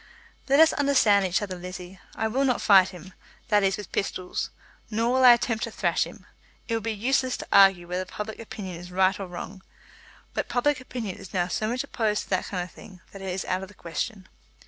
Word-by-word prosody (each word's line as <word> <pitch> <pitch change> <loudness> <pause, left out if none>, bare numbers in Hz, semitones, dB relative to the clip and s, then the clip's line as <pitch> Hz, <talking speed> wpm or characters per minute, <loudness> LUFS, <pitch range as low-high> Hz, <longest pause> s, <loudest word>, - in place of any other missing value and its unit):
"Let 275 +2 +5
us 320 0 +7
understand 235 -9 +4
each 180 +3 0
other, 190 -2 -4
Lizzie. 180 +1 -8 0.2
I 220 - 0
will 255 +5 0
not 255 -3 +2
fight 190 -3 +6
him, 185 0 -12 0.4
that 210 -1 +4
is, 195 -1 +1
with 205 -3 -9
pistols; 185 -2 -2 0.4
nor 230 +3 +1
will 260 0 +3
I 245 -1 +10
attempt 235 -2 -1
to - - -8
thrash - - +1
him. - - -13 0.4
It 230 - -2
would 225 - 0
be 225 +1 -2
useless 255 +4 0
to - - -8
argue 195 -3 +6
whether 180 +1 -2
public 210 +3 -6
opinion 195 -5 -7
is 175 +1 -10
right 190 +1 +2
or 195 - -5
wrong; 180 +2 -8 0.7
but - - -2
public 260 +2 +1
opinion 235 -6 -5
is 190 - -11
now 175 -1 +1
so 215 - -1
much 245 +3 -1
opposed 215 -2 -1
to - - -17
that 185 - +1
kind 180 -3 -3
of 180 - -10
thing, 185 -3 -14
that 195 - -10
it 190 - -4
is 185 +1 -3
out 185 0 -1
of 190 - -7
the 205 - -17
question. 190 +4 -5
200 Hz, 225 wpm, -26 LUFS, 185-230 Hz, 0.7 s, I